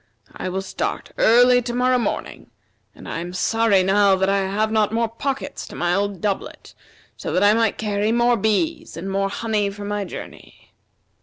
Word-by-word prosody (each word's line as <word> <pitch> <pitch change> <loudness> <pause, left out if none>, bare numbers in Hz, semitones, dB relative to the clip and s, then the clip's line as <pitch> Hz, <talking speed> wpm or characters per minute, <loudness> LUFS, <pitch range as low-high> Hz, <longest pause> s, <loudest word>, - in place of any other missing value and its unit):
I - - -4
will 190 +1 -3
start 190 - -4
early 245 +2 +5
to 240 0 -4
morrow 250 0 +2
morning, 235 - -4 0.5
and - - -12
I - - -4
am 175 +1 -6
sorry 215 0 +2
now 195 +1 +4
that 190 +1 0
I 200 0 +2
have 215 +2 0
not 215 -1 +2
more 230 +1 +1
pockets 275 +5 -4
to - - -10
my 175 0 0
old 200 -2 -1
doublet, 200 -2 -4 0.4
so - - -5
that - - +1
I 205 +1 +6
might 225 -1 +1
carry 210 0 -1
more 240 +1 +3
bees 265 - -1
and 175 +4 -6
more 195 0 0
honey 210 -1 -1
for 205 +1 -8
my 205 0 -2
journey." - - -11
210 Hz, 185 wpm, -22 LUFS, 195-230 Hz, 0.5 s, I